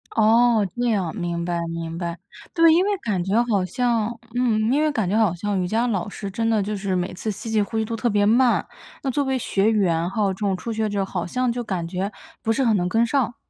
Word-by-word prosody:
哦， 225 -1 +4
这 245 0 0
样， 195 -4 -1
明 170 -2 -3
白 175 -1 -1
明 165 0 -5
白， 170 0 -4 0.4
对， 330 -1 +6
因 350 - +4
为 405 0 0
感 200 - -2
觉 205 +5 +2
好 205 -6 +1
像 235 +1 0 0.3
嗯， 240 -3 +2
因 295 - +2
为 310 -1 +2
感 220 -9 -1
觉 200 - 0
好 220 -6 +3
像 200 +1 -1
瑜 180 - -1
伽 225 +5 +1
老 205 -4 -1
师 200 -1 -6
真 225 +3 -1
的 215 -3 +2
就 210 +1 -3
是 195 -2 -2
每 180 0 -2
次 215 +4 -4
吸 210 +2 -5
气、 215 - +3
呼 215 +2 -3
气 220 - +1
都 230 +1 -3
特 235 +2 0
别 205 -1 +2
慢， 240 +3 +3 0.4
那 270 - 0
作 285 +3 0
为 265 -1 0
学 205 -3 +1
员， 175 -6 +1
还 215 - -5
有 195 -2 +2
这 190 - -12
种 195 -3 0
初 230 +4 -5
学 220 -1 -1
者， 200 -1 -1
好 180 -3 -4
像 250 +5 0
就 240 0 -3
感 180 -6 -3
觉 190 +3 -3 0.3
不 225 - 0
是 265 +3 +1
很 225 -3 +3
能 180 -2 0
跟 225 +4 +3
上。 245 -1 0
215 Hz, 275 characters per minute, -23 LUFS, 190-235 Hz, 0.4 s, 对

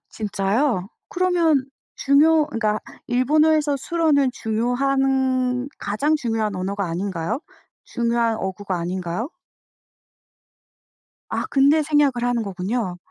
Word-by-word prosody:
진짜요? 205 +1 -1 0.2
그러면 350 -8 +2 0.3
중요 300 +2 +4
그러니까 215 -6 -1 0.3
일본어에서 295 +4 +2
술어는 290 -2 +1
중요한 255 +2 0
가장 285 +10 0
중요한 225 -6 -2
언어가 195 +2 -2
아닌가요? 180 - -3 0.4
중요한 235 -1 0
어구가 190 -1 -3
아닌가요? 180 - -3 2.0
아 - - -2
근데 285 +3 +4
생략을 290 -5 +2
하는 245 -1 +1
거군요. 195 0 -3
245 Hz, 255 characters per minute, -22 LUFS, 205-285 Hz, 2.0 s, 중요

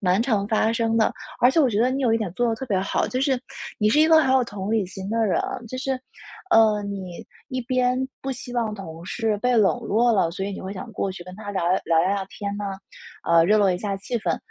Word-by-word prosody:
蛮 185 +1 +2
常 220 -5 +1
发 220 0 +2
生 225 -1 0
的。 220 - +3 0.3
而 245 - +6
且 295 +5 +3
我 265 -5 +3
觉 210 -1 0
得 245 - +4
你 270 +1 -2
有 240 -3 +3
一 225 - +3
点 210 -5 -3
做 240 +2 +1
得 225 - +1
特 265 - -6
别 200 -5 +1
好， 195 - 0
就 255 - -2
是 265 -2 +1 0.4
你 210 - +3
是 295 +8 +4
一 315 - +5
个 320 -1 +7
很 265 -4 +2
有 265 -1 +4
同 205 -4 -6
理 220 -3 +2
心 190 +1 -7
的 225 +1 +1
人。 185 - +1 0.3
就 255 - -6
是， 270 +1 -1 0.6
呃， 215 -6 +5
你 195 -3 -6 0.3
一 255 0 -2
边 250 0 +1 0.2
不 270 - -3
希 245 0 -8
望 230 -3 -1
同 165 -4 -9
事 220 -3 -1
被 250 +3 +1
冷 215 +2 +3
落 230 +2 +2
了， 195 -5 +2
所 190 +2 -4
以 200 - -3
你 - - -6
会 190 +1 -6
想 205 +5 -8
过 195 - -2
去 180 - -9
跟 180 +1 -11
他 205 -1 -7
聊 190 -3 -1
聊 185 - +3
聊 165 -1 +2 0.2
聊 195 -1 -3
天 200 0 -5
呢。 205 - -4 0.6
呃， 165 -1 +4
热 210 +5 +4
络 200 -2 +4
一 180 - -1
下 200 0 -3
气 225 +5 -3
氛。 170 -5 -1
215 Hz, 285 characters per minute, -24 LUFS, 195-245 Hz, 0.6 s, 个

